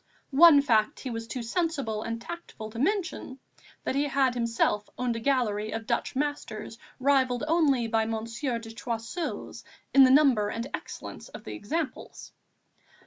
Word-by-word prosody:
One 290 -1 +8
fact 220 -5 +2
he 260 - -4
was 225 0 -5
too 245 +1 -4
sensible 275 -5 -1
and 230 +1 -4
tactful 235 -6 -8
to 230 - -7
mention 345 - -1 0.5
that - - -1
he 280 +2 +1
had 270 -2 +2
himself 230 -3 0
owned 245 -2 -1
a - - -3
gallery 225 -5 0
of 225 +1 -4
Dutch 235 +2 -1
masters 255 -6 -3 0.2
rivalled 260 -2 +2
only 290 -8 +3
by 225 -1 +1
Monsieur 230 +3 -3
de 225 -1 -9
Choiseul's 235 +8 -5 0.3
in 275 - +9
the 260 - +7
number 260 -7 +5
and 230 +2 -3
excellence - - -7
of - - -10
the - - -7
examples. 290 +5 -5
245 Hz, 155 wpm, -28 LUFS, 225-280 Hz, 0.5 s, in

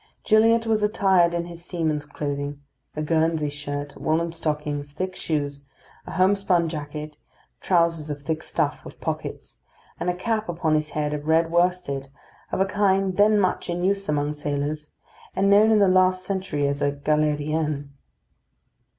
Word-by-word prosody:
Gilliatt 225 +1 +4
was 220 -1 +1
attired 195 -5 +3
in 170 0 -1
his 170 0 -10
seaman's 155 -4 -2
clothing: 145 -1 -4 0.4
a 155 - -2
Guernsey 160 -1 +1
shirt, 145 0 -5
woollen 165 +2 +1
stockings, 150 -3 -3
thick 185 +4 -3
shoes, 145 -4 -2 0.4
a - - -6
homespun 185 -3 +2
jacket, 150 -1 -6 0.4
trousers 170 -4 +1
of 145 -1 -5
thick 160 +1 -2
stuff, - - -2
with - - -12
pockets, - - -5 0.4
and - - -1
a 180 - 0
cap 215 +2 -2
upon 165 -2 0
his 155 0 +1
head 150 0 0
of 150 0 -5
red 165 +1 +3
worsted, 175 -6 0 0.4
of - - -1
a 190 - +4
kind 195 -1 +1
then 210 +1 +5
much 185 -2 0
in 175 0 -2
use 195 0 0
among 145 0 0
sailors, 150 +1 -3 0.4
and 200 +1 +3
known 210 +2 +6
in 220 - +5
the 200 -1 +5
last 185 0 +3
century 185 -7 -1
as 140 0 -2
a 145 - +2
galérienne. 150 0 0
160 Hz, 160 wpm, -24 LUFS, 150-185 Hz, 0.4 s, known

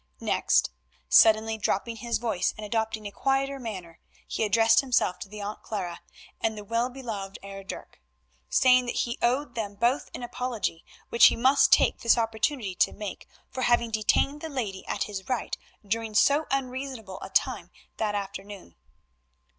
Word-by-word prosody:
Next, - - +2 0.4
suddenly 220 0 +5
dropping 225 +3 -1
his 235 0 -1
voice 215 -6 -1
and 215 - -6
adopting 220 0 -2
a 205 - -5
quieter 270 +5 0
manner, 185 -9 -7 0.3
he - - -2
addressed 225 +2 +5
himself 245 -9 +1
to 195 - -8
the 210 0 -8
Aunt 205 +1 -5
Clara 180 -5 -4 0.4
and 220 -1 0
the 210 - -7
"well 230 +4 0
beloved 220 -7 -6
Heer 195 0 -8
Dirk," 190 - -9 0.5
saying 255 -1 +5
that - - -3
he 235 0 -1
owed 250 +2 +1
them 210 -4 -4
both 240 +6 +1
an - - -7
apology, 240 -8 -3 0.3
which 235 - +8
he - - +2
must 265 +4 +4
take - - +4
this 230 - +4
opportunity 225 -1 -1
to - - +2
make, 210 -2 -7 0.2
for 260 - -4
having 240 -2 +2
detained 250 +7 +1
the 320 - -5
lady 215 -9 -4
at - - -1
his 195 -3 -7
right 250 -3 -1 0.3
during 220 +1 -2
so 285 +7 +4
unreasonable 260 -6 -4
a - - -7
time - - 0 0.3
that 210 -2 -1
afternoon. 200 - -6
225 Hz, 165 wpm, -27 LUFS, 205-250 Hz, 0.5 s, which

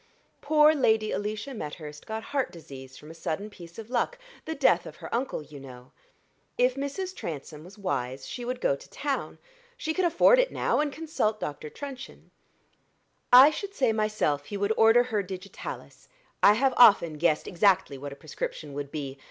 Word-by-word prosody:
"Poor 305 +1 +5
Lady 220 -7 +2
Alicia 215 +6 -3
Methurst 150 -6 -8
got 220 0 -4
heart 270 -5 -2
disease 135 -6 -11
from 150 - -12
a - - -10
sudden 165 +5 -4
piece 170 -4 -13
of 225 +1 -9
luck 255 - 0 0.3
the 320 - -4
death - - +3
of - - -10
her - - -9
uncle, 240 - -2
you 150 -1 -12
know. 125 -2 -12 0.7
If 250 +1 +3
Mrs. 285 +8 -4
Transome 150 -1 -7
was 185 +5 -14
wise 135 -9 -3
she 245 - -6
would 250 +1 -4
go 140 - +2
to - - -15
town 280 -2 -3 0.4
she 320 -10 -2
can 370 - 0
afford 350 +9 +5
it - - +2
now, - - 0
and 300 -1 0
consult 300 -9 -2
Dr. 150 -2 -5
Truncheon. 270 - -9 1.0
I 260 +4 +10
should 400 +5 -6
say 250 -5 +2
myself 215 -10 0
he 200 - -5
would 200 +2 +1
order 225 +2 +6
her 225 -4 -1
digitalis: 195 - -8 0.3
I 205 - +7
have 260 +4 +2
often 170 -10 +6
guessed 160 -2 +1
exactly 185 -6 +2
what 140 +1 -7
a - - -8
prescription 150 0 -6
would 140 0 -5
be. 140 -3 -6
210 Hz, 180 wpm, -27 LUFS, -, 1.0 s, I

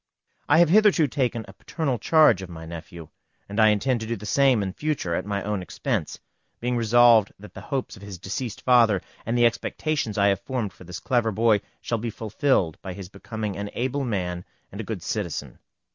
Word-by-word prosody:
I - - +6
have 170 -1 +5
hitherto 200 -5 +5
taken 125 -4 -1
a 95 - -12
paternal 135 - -3
charge 155 - +5
of 95 - -8
my 80 -1 -9
nephew, 85 0 -9 0.4
and 100 +2 -4
I 110 - +7
intend 110 +4 +2
to 110 - -5
do 115 - -1
the 105 - -9
same 130 -2 +3
in 95 -1 -4
future 150 - -2
at 90 - -2
my 100 -1 -2
own 105 -1 -2
expense, 90 - -3 0.4
being 125 +1 -1
resolved 115 -2 +5
that 100 -2 -13
the - - -9
hopes 135 -3 -4
of - - -15
his 100 -2 -8
deceased 100 +5 -5
father, 115 -6 +4 0.2
and 115 +2 0
the 120 - +5
expectations 120 0 -1
I 100 0 +4
have 100 - +1
formed 120 -8 -3
for 90 - -15
this 90 0 -7
clever 120 -3 +1
boy, 110 0 +3 0.2
shall 115 - -2
be 115 +2 -3
fulfilled 110 - 0
by 95 - -6
his 95 -1 -9
becoming 105 0 -5
an 100 0 -4
able 130 +3 -1
man 90 -7 -2 0.3
and - - -6
a - - -6
good - - -5
citizen. - - -4
110 Hz, 205 wpm, -25 LUFS, 100-125 Hz, 0.4 s, I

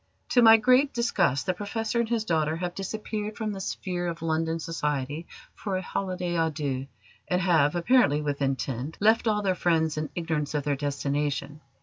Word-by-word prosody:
To 245 - +4
my 225 -1 +9
great 255 +5 +3
disgust, 190 - +1
the 185 - +1
Professor 225 +4 -2
and 235 -1 0
his 230 -2 0
daughter 160 -3 +1
have 175 +1 -3
disappeared 210 +2 -4
from 220 -2 -2
the 195 -1 -5
sphere 180 -2 -3
of 165 -1 -5
London 160 0 0
society 150 -1 -3 0.3
for 195 -3 -3
a - - -2
holiday 180 -2 -3
à 165 -1 +1
deux, 140 -3 -3 0.4
and 180 - +1
have, 165 -4 +3
apparently 175 - +3
with 145 -1 -3
intent, 135 +1 -2
left 220 +3 +3
all 210 -1 +1
their 190 -2 +2
friends 160 -3 +1
in 155 -1 -2
ignorance 160 -3 -2
of 145 - 0
their 145 0 0
destination. 145 +1 -2
170 Hz, 185 wpm, -27 LUFS, 150-205 Hz, 0.4 s, my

